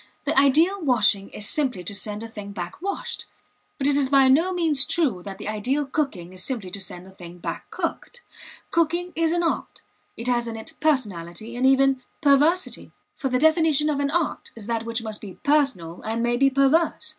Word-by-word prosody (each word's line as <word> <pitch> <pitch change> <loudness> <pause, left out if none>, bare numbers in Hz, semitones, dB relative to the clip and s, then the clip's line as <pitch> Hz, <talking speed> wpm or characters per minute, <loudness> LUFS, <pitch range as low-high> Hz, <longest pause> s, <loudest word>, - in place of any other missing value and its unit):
The - - -1
ideal 315 +9 +4
washing 215 -8 +2
is 205 - -2
simply 255 -11 0
to 180 - -5
send 210 +1 -4
a - - -6
thing 205 -3 -9
back 180 - -7
washed. 395 +1 -4 0.5
But 275 - -3
it 285 0 +3
is 280 -2 +2
by 270 -1 +5
no 325 +8 +4
means 325 -6 +5
true 305 - 0
that 195 +1 -8
the - - -7
ideal 250 +8 -1
cooking 260 - -3
is 185 -1 -2
simply 220 -9 -4
to 200 - -2
send 180 -1 -6
a 190 - -14
thing 175 -2 -12
back 175 - -6
cooked. 485 0 -5 0.5
Cooking 340 +2 0
is 330 -1 +1
an 345 0 0
art; 330 - -3 0.3
it 230 - -4
has 240 -1 +1
in 225 -1 -5
it 220 - -9
personality, 220 - -2
and 255 +2 +2
even 270 -1 +3 0.2
perversity, 300 +5 +2 0.2
for 270 - -3
the 255 - +1
definition 315 0 +3
of 285 - -2
an 280 0 0
art 330 +1 -1
is 225 -3 -10
that 230 0 -2
which 230 0 -3
must 215 -2 -3
be 195 -4 -9
personal 270 - +1
and 225 +2 -2
may 240 0 +1
be 275 +2 +4
perverse. 300 +4 +2
265 Hz, 205 wpm, -24 LUFS, 210-305 Hz, 0.5 s, by